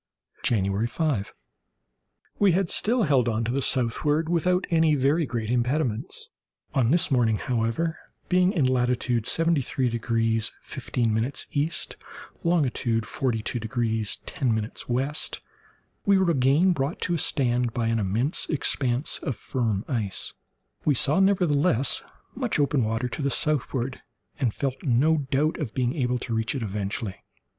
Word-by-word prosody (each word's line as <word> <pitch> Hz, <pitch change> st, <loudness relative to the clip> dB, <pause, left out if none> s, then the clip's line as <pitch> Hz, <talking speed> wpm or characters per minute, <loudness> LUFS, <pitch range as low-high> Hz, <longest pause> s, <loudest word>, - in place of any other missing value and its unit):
January 100 Hz, 0 st, +1 dB
5.—We 155 Hz, -, -4 dB
had 185 Hz, -1 st, +1 dB
still 235 Hz, +2 st, +2 dB
held 130 Hz, -, +3 dB
on 110 Hz, 0 st, -1 dB
to 115 Hz, -, -1 dB
the 135 Hz, +2 st, 0 dB
southward 145 Hz, +7 st, +1 dB
without 180 Hz, +2 st, +1 dB
any 160 Hz, -2 st, +4 dB
very 145 Hz, +3 st, +2 dB
great 115 Hz, -2 st, -3 dB
impediments. 125 Hz, -1 st, 0 dB, 0.4 s
On 125 Hz, -4 st, +2 dB
this 165 Hz, +1 st, +2 dB
morning, 115 Hz, -4 st, +3 dB
however, 125 Hz, +9 st, -1 dB, 0.3 s
being 180 Hz, 0 st, +3 dB
in 165 Hz, -10 st, +1 dB
latitude 125 Hz, -2 st, +1 dB
73 150 Hz, -6 st, +1 dB
degrees 115 Hz, -1 st, 0 dB
15' 115 Hz, +2 st, -1 dB, 0.2 s
E., 150 Hz, +3 st, 0 dB, 0.7 s
longitude 130 Hz, -9 st, +1 dB
42 120 Hz, -1 st, -2 dB
degrees 110 Hz, -2 st, -1 dB
10' 125 Hz, -5 st, -1 dB
W, 120 Hz, +4 st, -2 dB, 1.0 s
we 200 Hz, -1 st, +6 dB
were 190 Hz, -2 st, +3 dB
again 145 Hz, +6 st, +3 dB
brought 145 Hz, +1 st, -2 dB
to 175 Hz, -, 0 dB
a 170 Hz, -, 0 dB
stand 125 Hz, -5 st, +1 dB
by 115 Hz, 0 st, -2 dB
an 115 Hz, 0 st, +1 dB
immense 110 Hz, -, 0 dB
expanse 135 Hz, -3 st, 0 dB
of 135 Hz, -, -3 dB
firm 110 Hz, -3 st, -2 dB
ice. 110 Hz, -8 st, -1 dB, 0.5 s
We 150 Hz, -, +2 dB
saw, 145 Hz, +7 st, +3 dB
nevertheless, 170 Hz, -, +3 dB, 0.3 s
much -, -, -1 dB
open 140 Hz, -3 st, +2 dB
water 115 Hz, +3 st, -1 dB
to 125 Hz, -, -5 dB
the 140 Hz, -, +1 dB
southward, 135 Hz, -2 st, 0 dB, 0.4 s
and 125 Hz, -5 st, +1 dB
felt 135 Hz, +3 st, -3 dB
no 145 Hz, +3 st, +2 dB
doubt 150 Hz, +4 st, +1 dB
of 135 Hz, -9 st, -4 dB
being 125 Hz, -1 st, 0 dB
able 125 Hz, -4 st, 0 dB
to 120 Hz, -1 st, -4 dB
reach 115 Hz, +5 st, -1 dB
it 130 Hz, -, -2 dB
eventually. 100 Hz, 0 st, -4 dB
130 Hz, 140 wpm, -25 LUFS, 115-155 Hz, 1.0 s, we